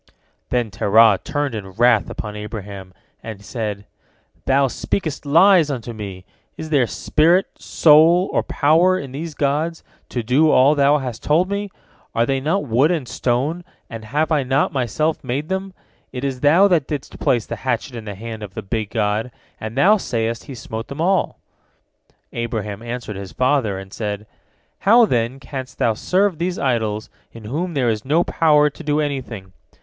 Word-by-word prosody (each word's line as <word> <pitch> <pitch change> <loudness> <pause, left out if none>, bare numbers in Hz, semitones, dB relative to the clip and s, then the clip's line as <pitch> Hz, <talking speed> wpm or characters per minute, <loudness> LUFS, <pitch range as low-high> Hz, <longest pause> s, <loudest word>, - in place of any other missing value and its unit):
Then 120 -3 -1
Terah 105 0 +4
turned 145 -3 -2
in 95 -4 -6
wrath 115 0 +3
upon 105 -1 -6
Abraham, 100 -3 -7 0.3
and 110 -2 -7
he 100 - -18
said: 105 -3 -5 0.6
"Thou 135 +1 +3
speakest 150 +3 -3
lies 170 +1 +5
unto 120 -4 -4
me! 100 -4 -8 0.3
Is 160 0 -7
there 135 -5 +3
spirit, 170 +10 +2
soul, 165 +4 +5
or - - +2
power 165 +5 +3
in 140 -7 -7
these 155 +3 -6
gods 150 +4 -1 0.3
to 120 - -3
do 135 +7 +3
all 140 +1 +5
thou 145 0 +4
hast 125 -5 -5
told 175 +6 +1
me? 200 0 -2 0.5
Are 115 - +3
they 135 +1 0
not 155 +5 -1
wood 130 +5 +3
and 160 -8 -1
stone? 130 +9 -1 0.3
and 115 -1 -7
have 150 +8 -1
I 150 -2 +3
not 135 +1 0
myself 140 +5 -1
made 135 +4 -3
them? 190 +1 -3 0.4
It 125 0 -6
is 135 -2 -2
thou 160 +9 +5
that 170 -8 +1
didst 145 -3 -6
place 120 -4 +1
the - - -6
hatchet 130 +1 -2
in 115 -2 -7
the 105 -2 -6
hand 110 +2 -7
of 100 -2 -9
the - - -5
big 105 +1 -3
god, 110 +1 -1 0.3
and 110 +3 -6
thou 200 +10 +5
sayest 115 - -3
he 135 - -8
smote 115 -1 -6
them 140 - -8
all." 185 +3 +1 1.0
Abraham 110 -3 -4
answered 120 -3 -6
his 95 -1 -8
father, 125 -6 +1
and 95 0 -10
said: 105 -1 -4 0.5
"How, 230 +4 +6
then, 120 - -1
canst 130 -2 -7
thou 115 - +2
serve 185 - 0
these 180 +1 -2
idols 110 -5 -1 0.2
in 115 - -11
whom 160 +10 -3
there 125 -4 +1
is 110 -1 -2
no 155 +6 +2
power 150 -3 +3
to 165 - -12
do 150 0 0
anything? 125 -10 -4
130 Hz, 175 wpm, -20 LUFS, 110-155 Hz, 1.0 s, How